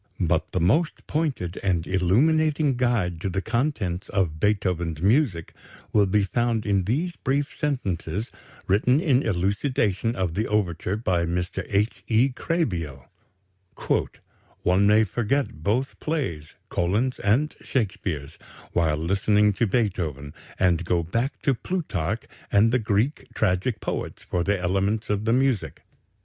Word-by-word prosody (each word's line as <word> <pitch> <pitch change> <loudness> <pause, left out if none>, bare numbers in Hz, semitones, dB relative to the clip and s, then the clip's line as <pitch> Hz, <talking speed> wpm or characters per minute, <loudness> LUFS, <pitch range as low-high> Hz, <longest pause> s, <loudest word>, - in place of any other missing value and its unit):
But 80 -3 0
the 90 - 0
most 120 - +1
pointed 140 - -2
and 90 -4 0
illuminating 145 - +2
guide 110 -9 0
to 95 - -1
the 95 - -1
contents 110 - -1
of 85 -6 0
Beethoven's 90 -6 0
music 100 - +1 0.4
will 105 -2 +4
be 105 +2 +2
found 115 +2 0
in 100 -3 +1
these 160 - -1
brief 140 +2 -1
sentences 105 - -2 0.4
written 125 +8 +3
in 140 -7 +3
elucidation 105 +2 0
of 90 -3 -1
the 110 +6 -1
overture 95 -3 0
by 90 -6 0
Mr. 85 +1 -2
H. 105 +3 0
E. 120 +4 +4
Krehbiel: 90 - -2 1.5
"One 95 +3 +4
may 105 +1 +5
forget 120 - -1
both 115 +10 -1
plays 130 - -3
[Collin's 105 +9 0
and 125 +10 +1
Shakespeare's] 95 - -3 0.3
while 80 -3 +1
listening 100 +5 +2
to 115 +4 +1
Beethoven, 85 - -1 0.2
and 90 -1 +2
go 85 -1 +1
back 115 - -2
to 140 - +3
Plutarch 115 - -2 0.3
and 105 +3 +5
the 125 - +3
Greek 110 +6 0
tragic 105 +3 0
poets - - -4
for 85 - -1
the 100 +1 +1
elements 100 +5 0
of 105 +1 -1
the 115 - +3
music. 130 -3 0
105 Hz, 135 wpm, -25 LUFS, 90-125 Hz, 1.5 s, may